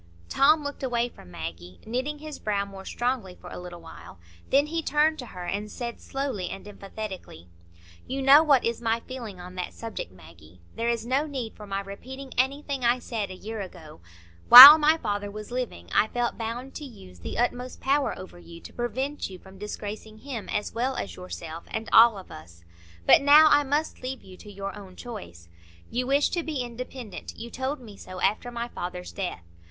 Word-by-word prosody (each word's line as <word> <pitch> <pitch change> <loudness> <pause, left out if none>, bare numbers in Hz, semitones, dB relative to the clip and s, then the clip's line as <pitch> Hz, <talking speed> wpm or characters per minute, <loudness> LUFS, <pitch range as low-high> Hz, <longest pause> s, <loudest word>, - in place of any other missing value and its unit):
Tom 300 +2 +4
looked 285 0 -6
away 245 -2 0
from 90 - -16
Maggie, 85 +2 -8
knitting 260 +7 -3
his 305 0 -9
brow 200 -2 -1
more 195 -1 -11
strongly 240 -7 -2
for 180 - -12
a - - -7
little 175 -1 -9
while. 90 - -12 0.3
Then 280 +2 +4
he 330 +2 -2
turned 310 +1 +2
to 250 - -7
her 180 -4 -8
and 205 +4 -3
said, 235 +1 -6
slowly 270 -9 -3
and 195 - -8
emphatically,— 195 - -8 0.6
"You 270 +1 -3
know 275 +3 +8
what 285 -5 +3
is 230 0 -1
my 230 0 0
feeling 230 -8 -8
on 180 +1 -9
that 180 -1 -5
subject, 225 - -6
Maggie. 85 -1 -17 0.2
There 230 +1 -1
is 230 -1 -1
no 270 +5 0
need 260 -6 -5
for 210 - -11
my 195 0 -2
repeating 260 +7 -9
anything 275 +1 -1
I 240 +1 +4
said 225 -4 -4
a 185 - -7
year 215 +3 -6
ago. 165 - -11 0.5
While 275 +6 +14
my 310 +1 +4
father 205 -7 -3
was 210 +2 -9
living, 245 - -4
I 215 - +4
felt 240 +1 -2
bound 240 +4 -5
to - - -8
use 95 - -12
the 85 - -6
utmost 245 +1 -2
power 275 +1 +1
over 185 -1 -11
you, 170 -1 -12
to - - -12
prevent 260 +4 -3
you 185 - -9
from 190 +1 -16
disgracing 210 +1 -7
him 240 -2 -7
as 210 - -2
well 255 +3 -1
as - - -5
yourself, 170 -2 -8
and 220 0 -4
all 225 -2 +8
of 190 - -11
us. 85 +2 -13 0.4
But - - +7
now 300 +2 +8
I 290 - +6
must 290 +3 -2
leave 260 0 -5
you 185 - -13
to 210 - -12
your 195 0 -6
own 195 -3 -11
choice. 190 - -9 0.4
You 250 +1 -1
wish 280 +2 +3
to 345 - -1
be 305 -6 -3
independent; 245 -2 -8
you 235 +1 -8
told 265 +3 -3
me 220 -5 -12
so 185 0 -9
after 215 +6 0
my 235 0 -4
father's 180 -5 -6
death. 180 - -5
230 Hz, 200 wpm, -26 LUFS, 190-265 Hz, 0.6 s, While